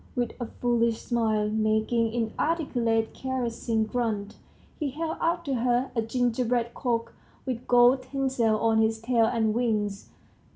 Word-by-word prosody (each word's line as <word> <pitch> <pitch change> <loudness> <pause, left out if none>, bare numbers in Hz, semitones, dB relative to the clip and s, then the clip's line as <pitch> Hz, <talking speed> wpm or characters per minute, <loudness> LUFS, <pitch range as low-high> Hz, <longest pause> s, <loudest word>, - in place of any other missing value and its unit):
With 245 -2 -1
a 240 - -3
foolish 235 -2 0
smile, 220 -3 0
making 220 +1 +1
inarticulate 235 -1 0
caressing 235 -3 -2
grunts, 215 -2 -2 0.4
he 300 -3 -1
held 320 +4 -4
out 340 +1 0
to 275 - -1
her 245 +1 +1
a 230 - +2
gingerbread 240 0 0
cock 230 -3 -2 0.3
with 250 -3 -4
gold 245 +2 +5
tinsel 255 -4 0
on 225 -1 +3
his 220 0 +2
tail 230 0 +2
and 220 -2 +1
wings. 215 -4 -1
235 Hz, 135 wpm, -27 LUFS, 225-250 Hz, 0.4 s, gold